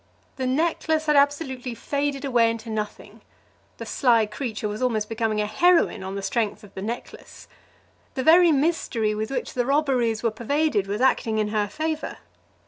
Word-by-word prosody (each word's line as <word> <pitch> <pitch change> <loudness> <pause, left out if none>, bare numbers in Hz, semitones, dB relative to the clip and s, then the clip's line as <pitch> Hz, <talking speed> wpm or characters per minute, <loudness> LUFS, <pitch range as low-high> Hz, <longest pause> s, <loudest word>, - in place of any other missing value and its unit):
The 260 -1 -1
necklace 315 +2 0
had 300 -1 +3
absolutely 280 -4 +1
faded 280 +2 -2
away 240 -4 +3
into 230 0 -5
nothing. 210 -1 -6 0.6
The - - -7
sly 235 -5 +3
creature 215 0 -4
was 210 +2 -5
almost 220 -4 0
becoming 220 -1 -1
a - - 0
heroine 335 - +3
on 190 +1 -5
the 200 - -4
strength 215 0 -1
of 205 - -15
the 190 - -7
necklace. 230 +4 -7 0.7
The 260 - -1
very 340 +2 +6
mystery 270 -8 0
with 215 +1 -3
which 270 - -3
the 245 - 0
robberies 260 -6 +1
were 230 - +2
pervaded 235 -1 0
was 205 +4 -3
acting 225 -4 +2
in 215 -1 0
her 210 -1 0
favour. 310 +7 -3
240 Hz, 170 wpm, -24 LUFS, 215-285 Hz, 0.7 s, very